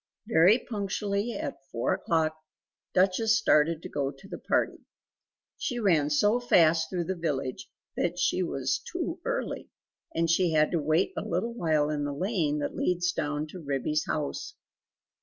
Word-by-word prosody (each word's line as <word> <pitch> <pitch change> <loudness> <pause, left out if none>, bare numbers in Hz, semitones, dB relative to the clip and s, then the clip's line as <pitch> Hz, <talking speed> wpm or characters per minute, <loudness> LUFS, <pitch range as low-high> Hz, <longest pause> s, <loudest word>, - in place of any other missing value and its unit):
Very 190 +1 +6
punctually 205 -1 -2
at 200 - -4
four 115 - 0
o'clock, 160 -1 0 0.6
Duchess 195 +5 +3
started 165 -6 +3
to - - -6
go 140 -2 -1
to 140 +7 -13
the - - -7
party. - - 0 0.8
She 245 - -2
ran 170 -10 +3
so 205 +11 +3
fast 165 -9 +4
through 180 -2 -1
the 190 - -2
village 135 -6 -3 0.3
that 175 0 -1
she 180 +1 +1
was 135 -7 -1
too - - -3
early, - - -3 0.5
and 165 0 +2
she 165 0 +2
had 155 0 +3
to 170 - +1
wait 155 - +1
a - - -2
little 235 0 -2
while 155 -8 +1
in 150 -1 -1
the 145 0 -2
lane 170 -4 0
that 145 - -3
leads 175 0 +1
down 150 -1 -2
to 185 - -9
Ribby's 145 +1 -1
house. 155 - -3
165 Hz, 160 wpm, -28 LUFS, 150-195 Hz, 0.8 s, Very